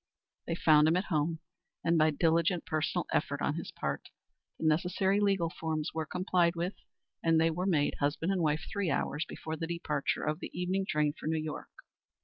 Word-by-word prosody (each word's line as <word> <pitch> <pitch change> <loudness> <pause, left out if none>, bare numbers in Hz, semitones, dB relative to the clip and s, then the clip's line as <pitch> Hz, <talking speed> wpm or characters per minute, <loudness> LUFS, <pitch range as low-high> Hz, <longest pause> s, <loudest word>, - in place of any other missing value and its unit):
They 165 - -1
found 155 -2 +5
him 165 +3 +3
at 185 - +1
home, 160 +2 0 0.4
and 170 +1 +3
by 155 -1 +5
diligent 165 +3 +2
personal 155 -1 -1
effort - - 0
on - - 0
his - - -5
part - - -4 0.5
the - - -4
necessary 185 +5 +2
legal 195 -5 +2
forms 160 -2 -3
were 160 -1 -2
complied 180 -1 +1
with 175 +3 -2 0.5
and 165 -1 +4
they 165 +1 +3
were 180 +4 -2
made 150 -6 +2
husband 150 +5 0
and 190 -2 0
wife 155 0 +1
three 200 -4 -1
hours 150 +1 -1
before 160 0 -5
the 165 - -3
departure 155 -4 -1
of 155 0 -1
the - - -6
evening 190 +2 0
train 150 -1 +2
for - - -8
New 160 0 +1
York. 155 -1 -5
165 Hz, 190 wpm, -31 LUFS, 155-180 Hz, 0.5 s, found